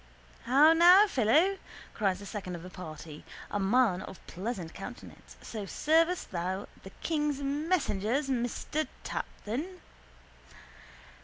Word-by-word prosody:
—How 285 +6 +6
now, 355 +5 +8
fellow? 330 - +3 0.3
cried 195 -4 0
the 200 - -10
second 195 -4 -5
of 170 - -9
the 185 - -9
party, 155 -4 -9 0.3
a 205 - -1
man 200 -2 +3
of 190 - -10
pleasant 185 -3 -5
countenance, - - -10
So 210 -3 -6
servest 330 - +1
thou 185 +2 -3
the 190 - -10
king's 295 -3 0
messengers, 280 - 0
master 260 +4 -2 0.2
Taptun? 310 - -5
240 Hz, 120 wpm, -30 LUFS, 190-310 Hz, 0.3 s, now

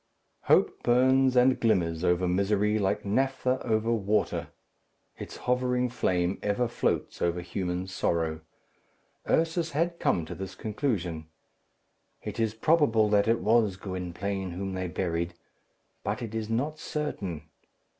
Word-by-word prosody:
Hope - - +3
burns 130 +1 +4
and 125 +1 +4
glimmers 90 -7 +1
over 90 0 +2
misery 105 +3 +1
like 95 0 0
naphtha 130 +4 0
over 110 0 +1
water. 105 -1 0 0.7
Its - - -7
hovering 125 0 0
flame 90 -6 0
ever 105 +4 0
floats 120 - -1
over 85 0 +1
human 90 0 -3
sorrow. 80 -4 -1 0.9
Ursus 165 0 +1
had 170 +3 0
come 85 - +1
to - - -7
this 95 -1 -7
conclusion, 95 - -2 1.0
"It - - -5
is 110 -1 0
probable 115 -5 +3
that 105 0 +3
it 115 +1 +2
was 110 -4 +3
Gwynplaine 95 +1 -4
whom 95 +2 -4
they 95 0 -2
buried, 85 0 -2 0.7
but - - -2
it 115 -2 -6
is 110 -1 -3
not 145 +7 -1
certain. 95 - -4
105 Hz, 130 wpm, -28 LUFS, 90-125 Hz, 1.0 s, burns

